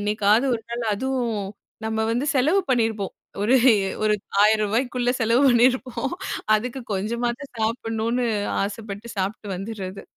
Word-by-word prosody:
என்னைக்காவது 210 +4 +2
ஒரு 225 - -13
நாள் 235 0 -3
அதுவும் 235 -5 -2 0.4
நம்ம 220 0 0
வந்து 255 +5 -1
செலவு 310 +10 +3
பண்ணியிருப்போம் 225 -5 0 0.3
ஒரு 245 +5 +4 0.5
ஒரு 210 0 +3 0.3
1000 215 0 +4
ரூபாய்க்குள்ள 245 +3 0
செலவு 230 +4 +3
பண்ணியிருப்போம் 255 +2 +2 0.4
அதுக்கு 250 +4 -2
கொஞ்சமாவது 235 +6 -2
சாப்பிடணுனு 225 +2 -1 0.4
ஆசைப்பட்டு 210 +1 -5
சாப்பிட்டு 200 +2 -3
வந்துடுறது. 195 -1 -6
225 Hz, 120 wpm, -23 LUFS, 210-245 Hz, 0.5 s, ஒரு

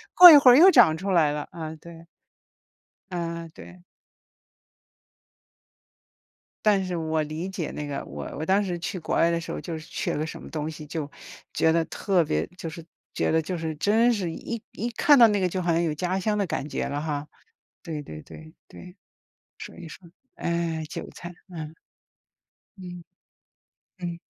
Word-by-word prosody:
过 355 -1 +12
一 295 - +11
会 265 -3 +8
儿 - - +8
又 355 +6 +9
长 210 - +6
出 195 +3 -4
来 160 -5 +4
了， 150 0 -4
啊， 160 -1 -6
对。 170 -1 -12 1.1
嗯， 170 -2 -4
对。 180 +2 -13 2.8
但 200 -2 +4
是 185 -1 -3
我 160 -1 -1
理 155 +4 -5
解 185 -4 -4
那 150 -1 -5
个， 140 - -4
我 - - -7
我 155 - -3
当 195 +4 +3
时 180 -3 -3
去 180 +2 -4
国 - - -3
外 165 - +4
的 170 - 0
时 165 - -7
候， - - -4
就 165 -3 -5
是 155 - -13
缺 180 -5 -2
了 - - -3
个 155 - -1
什 - - -8
么 - - -10
东 155 -1 -4
西， 155 -1 -9
就 150 -1 -5 0.4
觉 160 - +3
得 165 0 +2
特 185 -4 +1
别 75 - -1
就 165 - -5
是 160 +1 -10 0.3
觉 - - 0
得 160 - +3
就 180 +3 -4
是 160 -1 -3
真 220 +9 +3
是 185 -7 -2
一 230 +6 -6
一 235 - -4
看 285 +5 +5
到 235 - +9
那 205 - +1
个， 185 - +1
就 185 +1 -3
好 170 - 0
像 165 +1 +2
有 160 -3 0
家 180 +4 -2
乡 210 +2 0
的 200 - +1
感 150 -4 -3
觉 - - -3
了 145 +1 -3
哈。 150 -1 -3 0.5
对 155 -3 -5
对 75 - -9
对， 155 0 -13
对， 180 0 -13 0.6
所 - - -9
以 165 - -9
说， 170 +2 -13 0.3
哎， 170 -2 -2
韭 - - -7
菜， 175 0 -9 0.2
嗯。 160 -3 -8 1.0
嗯。 180 -2 -9 1.0
嗯。 175 -1 -5
170 Hz, 200 characters per minute, -25 LUFS, 160-190 Hz, 2.8 s, 过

